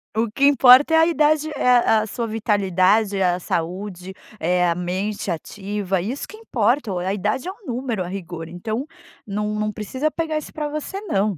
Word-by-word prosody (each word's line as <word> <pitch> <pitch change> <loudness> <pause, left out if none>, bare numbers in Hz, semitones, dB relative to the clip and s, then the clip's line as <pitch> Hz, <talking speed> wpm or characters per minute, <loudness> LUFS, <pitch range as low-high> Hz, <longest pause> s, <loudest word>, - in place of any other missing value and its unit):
O 225 -1 0
que 275 +5 +2
importa 275 +2 +7
é - - +6
a 320 - +6
idade, 310 -1 +2
é - - +1
a 235 -3 +4
a 215 - -4
sua 235 +3 -3
vitalidade, 205 -2 +2
é 190 - +1
a - - -6
saúde, 185 +2 -4 0.2
é 180 +1 +2
a 170 - +2
mente 190 +4 -3
ativa, 195 +2 -3
isso 240 +10 -4
que 430 - -11
importa 245 - 0
o 185 - -2
a 185 +2 -1
idade 210 - -2
é - - -2
um 395 0 -17
número 240 -5 -2
a - - -6
rigor, 175 -3 -6
então, 220 - -4 0.4
num 210 +1 -2
num 215 0 -1
precisa 255 +8 -2
pegar 315 -1 -2
isso 305 - -10
pra 300 -1 -3
você 305 +6 -5
não. 205 - 0
215 Hz, 200 wpm, -22 LUFS, 190-265 Hz, 0.4 s, importa